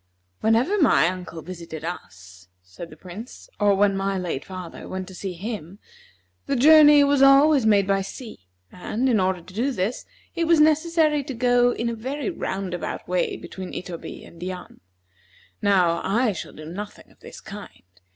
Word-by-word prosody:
"Whenever 245 - +2
my 165 - +5
uncle 180 -3 -6
visited 165 -3 -8
us," 90 - -9 0.2
said 90 - -10
the - - -14
Prince, 195 +7 -11
"or 205 -1 +4
when 200 0 +3
my 195 0 -1
late 175 -7 -3
father 185 -3 -9
went 185 0 -5
to 190 - -11
see 185 +1 -5
him, 195 -1 -6 0.7
the 280 - 0
journey 295 +2 +7
was 280 -1 +2
always 275 -2 +6
made 200 -2 +4
by 195 0 +1
sea; 195 - -9 0.2
and, 220 +8 -2
in 235 -5 +3
order 185 -1 0
to 185 - -15
do 240 +7 0
this, 210 +1 -3 0.3
it 335 - -1
was 330 -1 +4
necessary 310 -1 +3
to 270 -1 -6
go 245 0 +3
in 235 -1 -3
a 235 - -1
very 270 - -4
roundabout 190 - -4
way 180 0 -1
between 185 -1 -8
Itoby 175 -2 -7
and 170 - -15
Yan. 180 0 -7 0.8
Now, 180 -5 +2
I 230 +3 +1
shall 180 - -7
do 155 - -11
nothing 200 +6 -8
of - - -26
this - - -12
kind. - - -11
200 Hz, 170 wpm, -23 LUFS, 180-260 Hz, 0.8 s, journey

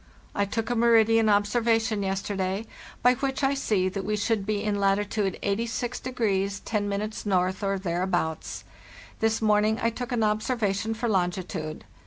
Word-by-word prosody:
I 200 - +1
took 225 +3 -2
a - - +1
meridian 225 -1 +4
observation 220 +1 +2
yes 195 0 -1
terday, 195 +1 -2 0.4
by 250 +1 +6
which 270 +1 -2
I 270 +1 +3
see 210 -9 +1
that 195 +1 -3
we 210 +2 -1
should 210 -1 0
be 210 -1 0
in 210 -1 0
latitude 200 0 +1
86 230 +4 -1
10° 205 -2 -1
N,, - - 0
or 190 +2 +1
thereabouts.* 175 - -2 0.6
This 225 0 +1
morning 215 +1 +3
I 230 - +1
took 245 +2 -6
an 235 -2 +1
observation 215 -1 0
for 235 +2 -2
longitude. 180 -5 -2
210 Hz, 150 wpm, -26 LUFS, 195-225 Hz, 0.6 s, by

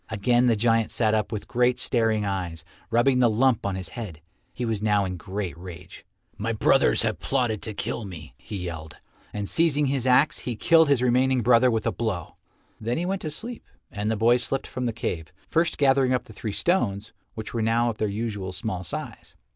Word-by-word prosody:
Again 120 +5 +2
the 115 - +4
giant 115 0 +2
sat 110 -2 +1
up 110 +1 0
with 105 -3 -5
great 125 0 +2
staring 110 -3 +1
eyes, 90 -5 -4 0.2
rubbing 125 +2 +3
the 120 -2 +5
lump 115 -1 +2
on 100 - -2
his 95 -2 -5
head. 100 -10 -7 0.3
He 125 - -4
was 110 -3 -2
now 105 -2 +2
in 90 - -3
a - - -5
great 95 -2 -5
rage. 90 0 -11 0.3
"My 115 +2 -1
brothers 60 - +3
have - - -1
plotted 110 -4 0
to 110 - -5
kill 115 - -3
me," 80 -10 -9
he 105 - -8
yelled, 80 -4 -6 0.3
and 105 -1 -4
seizing 150 0 +2
his 135 -2 -1
axe 130 +4 +4
he 120 - -4
killed 160 +5 +4
his 135 -3 +3
remaining 125 +1 +3
brother 125 +2 +5
with 110 -2 -1
a - - +2
blow. 100 -8 -4 0.4
Then 115 +3 -2
he 170 - -1
went 195 +1 -2
to 155 - -3
sleep, 230 +10 -7 0.3
and 105 +1 -2
the 110 - 0
boy 115 +3 +4
slipped 130 +2 -1
from 125 -1 -3
the - - 0
cave, 80 -7 -4 0.2
first 165 0 +1
gathering 135 -2 +3
up 125 - -2
the 110 - -14
three 110 +1 -5
stones, 110 - 0 0.2
which 110 -1 -6
were 115 - -1
now 115 +2 +2
of 105 - -12
their 110 - +1
usual 105 -3 -3
small 90 0 -4
size. 85 - -6
115 Hz, 210 wpm, -25 LUFS, 100-125 Hz, 0.4 s, the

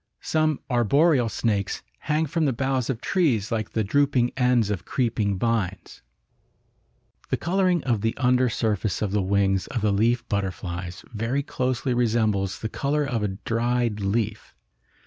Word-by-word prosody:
Some 155 -2 +1
arboreal 125 +2 +3
snakes 105 -2 -1 0.2
hang 155 +1 0
from 160 +2 0
the 135 - +1
boughs 130 0 -1
of 120 -4 -2
trees 125 - +1
like 110 -3 -1
the 110 - +1
drooping 130 +2 +2
ends 125 -5 +2
of 100 - -3
creeping 110 -6 0
vines. 100 -3 -2 1.3
The - - +1
coloring 180 -1 +1
of 115 -6 0
the 115 +1 -1
under 125 0 +3
surface 110 -4 -1
of 100 - -1
the 105 0 +1
wings 95 0 +1
of 120 -5 -3
the 105 0 +2
leaf 115 +4 +1
butterflies 90 -3 -4
very 115 +6 -1
closely 130 -1 -1
resembles 110 -5 +1
the 110 - -1
color 145 +6 -1
of 120 -5 -2
a 105 - +1 0.2
dried 120 -1 0
leaf. 105 +2 -2
115 Hz, 150 wpm, -25 LUFS, 105-130 Hz, 1.3 s, arboreal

